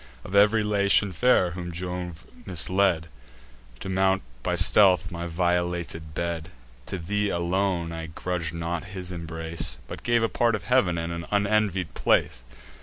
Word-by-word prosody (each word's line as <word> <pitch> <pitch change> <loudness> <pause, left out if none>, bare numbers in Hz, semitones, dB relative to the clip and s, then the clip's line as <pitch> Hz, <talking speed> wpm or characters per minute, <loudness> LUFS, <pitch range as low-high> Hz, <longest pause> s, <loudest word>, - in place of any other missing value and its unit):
Of 95 - -9
ev'ry 105 +2 +5
Latian 100 -1 +2
fair 90 -1 +3
whom 90 0 -6
Jove 90 -1 -5 0.2
misled 90 -1 +1 0.7
To - - -6
mount 95 0 +1 0.2
by - - -1
stealth 95 -4 +5
my 85 0 -4
violated 85 -2 -2
bed, 85 -1 -3 0.4
To 95 - -3
thee 105 +4 -1
alone 85 -1 0
I 80 0 -5
grudg'd 85 0 -3
not 85 0 -3
his 90 0 -6
embrace, 80 -1 -3
But - - -8
gave 120 -1 +2
a - - +3
part 115 0 +1
of 105 - -6
heav'n, 100 -9 +2
and 85 +1 -3
an 85 0 -6
unenvied 100 -3 +1
place. 60 - +1
90 Hz, 150 wpm, -26 LUFS, 85-100 Hz, 0.7 s, ev'ry